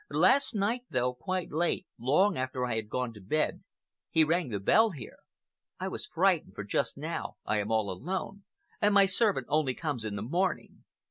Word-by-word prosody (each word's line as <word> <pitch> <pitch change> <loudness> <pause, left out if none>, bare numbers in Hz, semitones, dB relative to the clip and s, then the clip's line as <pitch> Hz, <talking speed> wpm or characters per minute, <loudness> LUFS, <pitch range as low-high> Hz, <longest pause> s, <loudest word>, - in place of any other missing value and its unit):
Last 275 -3 +4
night, 215 +5 0
though, 125 -1 0
quite 185 +7 -3
late—long 170 - +1
after 130 -2 -2
I 120 -2 -2
had 110 -1 -3
gone 125 -1 -2
to 105 - -13
bed—he 155 +6 -2
rang 165 -1 +1
the 105 -3 -2
bell 220 - +4
here. 140 - -9 0.6
I - - -2
was - - -5
frightened, - - +1
for - - -5
just - - -1
now - - -4
I 105 - +1
am 105 +2 -2
all 110 -2 +2
alone, 190 - -4 0.4
and 205 -1 +3
my 200 -1 +8
servant 195 - +2
only 145 -3 +1
comes 145 -8 -3
in 105 -2 -4
the 100 - -4
morning. 175 - -2
150 Hz, 180 wpm, -30 LUFS, 120-190 Hz, 0.6 s, my